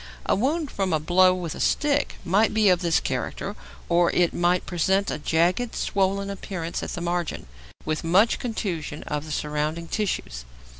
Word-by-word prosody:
A - - +2
wound 290 - 0
from 195 -3 -1
a 155 - +2
blow 185 +4 +4
with 175 -4 -4
a - - -9
stick 290 -1 +1
might 200 +6 +2
be 215 -2 +5
of 180 -1 +4
this 170 -3 +2
character, - - -3 0.3
or 170 0 +3
it 175 -1 +2
might 175 +1 +1
present 190 +3 +1
a - - -3
jagged, 175 +10 +1
swollen 195 0 0
appearance 185 -4 -5
at - - -5
the 175 - -4
margin, 175 -1 -2 0.4
with 155 -1 -2
much 190 +8 +3
contusion 175 -10 -4
of 150 0 -3
the 155 - -8
surrounding 150 +3 -2
tissues. 170 - -2
180 Hz, 170 wpm, -25 LUFS, 165-200 Hz, 0.4 s, be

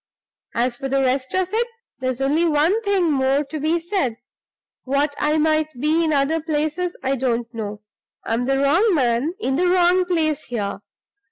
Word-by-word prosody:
As 240 +1 0
for 270 0 -4
the 275 0 +1
rest 260 +2 0
of 370 +1 0
it, 470 +2 +1 0.3
there's 255 0 -2
only 305 +5 +2
one 325 +8 +2
thing 390 -6 +1
more 270 +1 +2
to 305 +2 -6
be 315 +4 +1
said. 330 - -1 0.7
What 280 +2 0
I 300 +1 +2
might 310 -3 +1
be 310 +4 +2
in 320 - +1
other 300 +3 +1
places 315 +3 -2
I 270 +1 +1
don't 240 -2 -1
know: 210 -2 -5 0.4
I'm 230 +2 -1
the 270 +1 +1
wrong 340 +9 +3
man 255 +4 +1
in 270 -9 -1
the 360 +2 +2
wrong 360 0 +3
place 315 -4 0
here. 205 -5 -3
295 Hz, 175 wpm, -21 LUFS, 265-335 Hz, 0.7 s, wrong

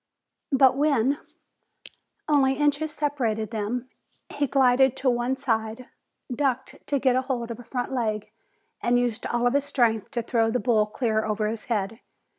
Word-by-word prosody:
But 265 -1 +5
when 280 -1 +2 1.1
only 275 -3 +3
inches 295 +1 +1
separated 240 -8 -1
them, 230 +3 -3 0.4
he 285 -1 -1
glided 265 -1 +4
to 260 -1 +2
one 240 +2 -1
side, 225 -1 -2 0.5
ducked 265 -1 -1
to 285 - +1
get 260 -2 +2
hold 255 -2 -2
of 230 - -7
a - - -9
front 245 +2 -4
leg, 215 -4 -2 0.5
and 240 0 +2
used 245 -1 -1
all 240 +1 +1
his 280 +1 +2
strength 235 -7 +1
to 240 -4 -3
throw 225 -1 +1
the 250 +2 0
bull 220 -4 +2
clear 220 -1 0
over 215 0 -1
his 220 0 -4
head. 220 -1 -2
245 Hz, 155 wpm, -25 LUFS, 225-270 Hz, 1.1 s, But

